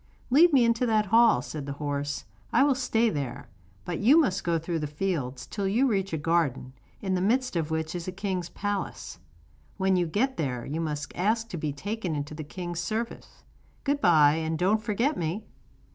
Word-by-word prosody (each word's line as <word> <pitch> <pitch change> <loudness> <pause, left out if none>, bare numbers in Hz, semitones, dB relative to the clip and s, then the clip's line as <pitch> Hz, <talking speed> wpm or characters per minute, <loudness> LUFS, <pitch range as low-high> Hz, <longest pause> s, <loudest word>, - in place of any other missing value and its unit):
'Lead 330 +6 +7
me 260 -5 +5
into 230 +1 +2
that 215 -2 +2
hall,' 230 +3 +5
said 145 -3 -6
the 140 - -3
horse, 145 -1 -3 0.3
'I 250 - +5
will 285 -1 +4
stay 235 -3 +1
there; 140 -2 -5 0.4
but 175 - -3
you 270 +10 +6
must 200 - +1
go 170 -1 +1
through 165 +1 -2
the 150 - -2
fields 145 -5 -3
till 200 -2 -3
you 230 +8 +2
reach 195 -5 0
a 160 - -1
garden, 145 -5 0 0.3
in 190 -1 0
the 180 - +1
midst 250 +4 +1
of 160 -2 -1
which 160 0 -2
is 175 -1 -5
a - - -2
king's 185 -2 -3
palace. 205 -1 -4 0.6
When 190 -1 +2
you 175 -2 +1
get 255 +11 0
there 125 -6 -2
you 155 +4 -3
must 150 -2 -4
ask 225 +5 0
to 175 - -5
be 150 -2 -2
taken 190 +3 -3
into 145 +1 -4
the 155 0 -6
king's 175 +2 -5
service. 220 +6 -4 0.4
Good 285 0 0
bye, 155 -3 +5
and 160 0 -1
don't 200 +6 +2
forget 230 +8 0
me. 175 +6 -3
180 Hz, 200 wpm, -27 LUFS, 155-220 Hz, 0.6 s, Lead